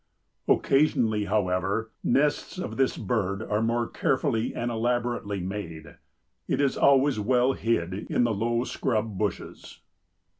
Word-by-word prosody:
Occasionally, 115 -7 +2
however, 100 +2 0
nests 145 +7 +1
of 180 - -4
this 135 -1 +1
bird 100 -2 -1
are 105 0 -1
more 115 +1 0
carefully 130 -4 0
and 120 +1 -2
elaborately 120 -3 -1
made. 85 -4 -6 0.5
It - - 0
is 140 -2 +2
always 140 -3 +4
well 125 +4 +2
hid 95 -8 -1
in 105 +5 -1
the 120 -2 +1
low 115 +3 0
scrub 110 -6 -2
bushes." 105 -1 -4
115 Hz, 125 wpm, -26 LUFS, 100-125 Hz, 0.5 s, always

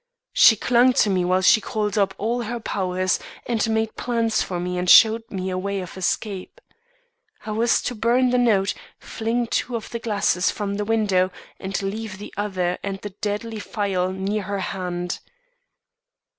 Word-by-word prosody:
She 220 - +7
clung 245 +3 +3
to 220 -6 +3
me 185 -1 +1
while 185 +1 +1
she 215 - +6
called 210 -1 -2
up 195 -2 +1
all 235 +3 -1
her 235 +1 -4
powers, 185 -3 -1 0.3
and 230 -2 0
made 220 0 0
plans 230 -2 0
for 180 -2 -3
me 180 0 -2
and 180 0 -1
showed 225 +3 +7
me 190 -1 -3
a 185 - -2
way 200 +1 -2
of 180 -2 -7
escape. 190 +1 -3 0.9
I 215 - -4
was 225 +2 +2
to - - -2
burn 245 +3 +2
the 250 - +3
note, 205 -5 +2 0.3
fling 230 +2 -2
two 240 +1 -2
of 225 - -6
the 235 - -3
glasses 200 -5 +1
from 200 -1 -3
the 210 - -2
window 205 -4 +2 0.3
and 190 0 -3
leave 205 0 -4
the 205 - -10
other 185 -4 -1
and 195 -1 -4
the 205 - -6
deadly 210 +3 -4
phial 195 -3 -1
near 195 +3 -2
her 200 +1 -3 0.2
hand. 180 -2 -4
205 Hz, 175 wpm, -23 LUFS, 190-225 Hz, 0.9 s, She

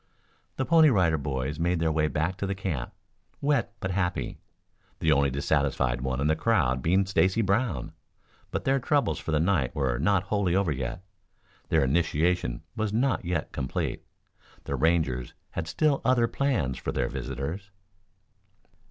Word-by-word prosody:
The 130 - -1
Pony 160 -1 +6
Rider 85 - +3
Boys 70 +1 -3
made 85 +1 +1
their 80 -1 +1
way 75 0 +2
back 80 +5 -1
to 100 - -2
the 100 - -2
camp, 95 -10 -3 0.5
wet 140 -4 +1
but 95 - -2
happy, 90 -1 -2 0.6
the - - +1
only 70 0 +4
dissatisfied 65 -3 0
one 65 0 -2
in 70 - 0
the 80 +1 +3
crowd 80 - +1
being 95 +7 +2
Stacy 95 +3 +2
Brown. 100 - 0 0.6
But - - -3
their 135 +1 +3
troubles 145 +2 +1
for - - -4
the 75 - +2
night 80 -6 +1
were 65 -4 0
not 95 +4 +2
wholly 100 -3 0
over 95 -4 +2
yet. 65 +6 -4 0.7
Their 80 -3 +3
initiation 80 -1 +1
was 110 -2 -1
not 120 -1 +1
yet 85 -3 -2
complete. 65 -2 -3 0.6
The - - -3
Rangers 75 -7 0 0.2
had 85 -1 -4
still 140 - +1
other 125 -2 +3
plans 115 - -1
for - - -3
their - - 0
visitors. 80 +10 -5
85 Hz, 160 wpm, -27 LUFS, 70-100 Hz, 0.7 s, Pony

